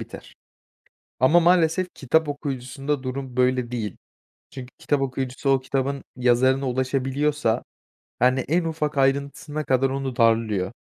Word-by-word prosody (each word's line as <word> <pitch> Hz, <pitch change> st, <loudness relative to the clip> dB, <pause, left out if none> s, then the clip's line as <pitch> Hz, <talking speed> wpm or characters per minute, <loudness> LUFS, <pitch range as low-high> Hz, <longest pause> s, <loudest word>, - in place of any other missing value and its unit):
biter. -, -, -10 dB, 0.9 s
Ama 155 Hz, +7 st, +5 dB
maalesef 175 Hz, +1 st, +3 dB
kitap 150 Hz, +4 st, +1 dB
okuyucusunda 140 Hz, 0 st, -3 dB
durum 130 Hz, -1 st, -5 dB
böyle 125 Hz, -1 st, +1 dB
değil. 110 Hz, -5 st, -4 dB, 0.5 s
Çünkü 130 Hz, -2 st, -9 dB
kitap 145 Hz, -2 st, 0 dB
okuyucusu 130 Hz, +1 st, -2 dB
o 135 Hz, -1 st, +3 dB
kitabın 135 Hz, +1 st, -2 dB
yazarına 130 Hz, +2 st, +2 dB
ulaşabiliyorsa, 135 Hz, 0 st, 0 dB, 0.6 s
yani, 130 Hz, +2 st, +3 dB
en 165 Hz, +6 st, 0 dB
ufak 155 Hz, -3 st, -2 dB
ayrıntısına 140 Hz, +2 st, 0 dB
kadar 130 Hz, 0 st, +2 dB
onu 135 Hz, -2 st, -3 dB
darlıyor. 110 Hz, -4 st, +2 dB
135 Hz, 120 wpm, -24 LUFS, 125-145 Hz, 0.9 s, Ama